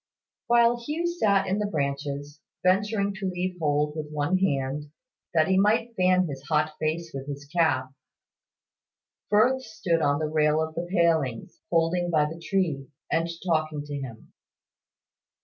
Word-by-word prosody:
While 235 0 +5
Hugh 300 +8 -3
sat 210 - +2
in 195 +2 0
the 210 - 0
branches, 145 -2 -3 0.2
venturing 200 +2 +2
to 190 - -1
leave 180 0 -3
hold 150 -1 +1
with 155 -1 -5
one 150 +5 0
hand, 145 -4 -1 0.5
that 155 -1 +4
he 190 0 +3
might 225 +3 +2
fan 185 0 +3
his 140 -4 -6
hot 155 0 +2
face 160 +1 -2
with 135 0 -6
his 140 0 -6
cap, 145 -5 +1 1.4
Firth 245 +6 +4
stood 210 -8 -1
on 145 -1 +2
the 155 - -1
rail 155 0 +2
of 160 0 -2
the 170 +2 -4
palings, 160 - +1
holding 175 +1 +1
by 155 -3 +3
the 165 +2 -7
tree, 160 -7 -1 0.2
and 165 +1 +1 0.2
talking 155 -3 0
to 145 - -7
him. 125 -6 -8
165 Hz, 150 wpm, -26 LUFS, 145-190 Hz, 1.4 s, While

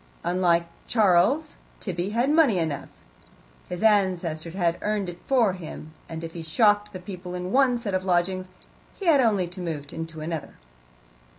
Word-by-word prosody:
Unlike 175 -1 +2 0.2
Charles, 225 - +3 0.2
Tibby 180 -1 -3
had 240 +6 +1
money 300 - +4
enough; 160 -5 -2 0.8
his 180 +4 -4
ancestors 180 -6 +1
had 175 -3 +1
earned 210 -3 -1
it 175 0 -9
for 240 -8 +3
him, 155 -3 -9 0.2
and 165 0 -6
if 165 0 -6
he 170 - -6
shocked 205 +5 +2
the 185 - -7
people 180 -1 -7
in 180 +1 -4
one 260 -2 +4
set 225 -5 -4
of 185 0 0
lodgings 185 0 0 0.5
he 395 - -5
had 305 -6 +6
only 205 -7 +2
to 180 +1 -8
move 150 -5 -5
into 165 -1 -6
another. 160 -1 -4
185 Hz, 165 wpm, -25 LUFS, 170-210 Hz, 0.8 s, had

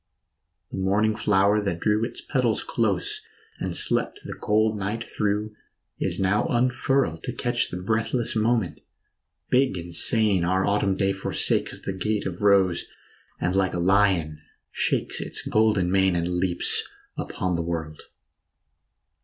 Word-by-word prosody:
The - - -5
morning 105 +3 +1
flower 100 +1 +2
that 100 -4 -2
drew 105 +2 +1
its 115 - -4
petals 125 -6 0
close 100 -6 -1 0.4
And - - -3
slept - - 0
the - - -6
cold 110 +1 +1
night 105 +3 -4
through 105 +1 -2 0.4
is - - -1
now 95 +2 +1
unfurled 125 - +1
To - - -2
catch - - -1
the 90 - -5
breathless 110 +5 -1
moment; 110 -3 0 0.7
big 130 -5 +3
and 85 0 -7
sane 105 0 +2
Our 95 +2 +1
autumn 100 -1 +1
day 95 0 +1
forsakes 95 - 0
the 95 - -4
gates 105 +2 -2
of 90 -1 -5
rose, 95 -4 +3 0.5
And 90 +2 -1
like 95 -2 +1
a - - -1
lion 90 -5 +2 0.3
shakes - - 0
its - - 0
golden 105 -5 +2
mane 95 -1 +3
And 85 +1 -1
leaps 90 -1 +1 0.3
upon 95 -1 -3
the 85 - -1
world. 80 -2 -4
100 Hz, 145 wpm, -25 LUFS, 90-110 Hz, 0.7 s, big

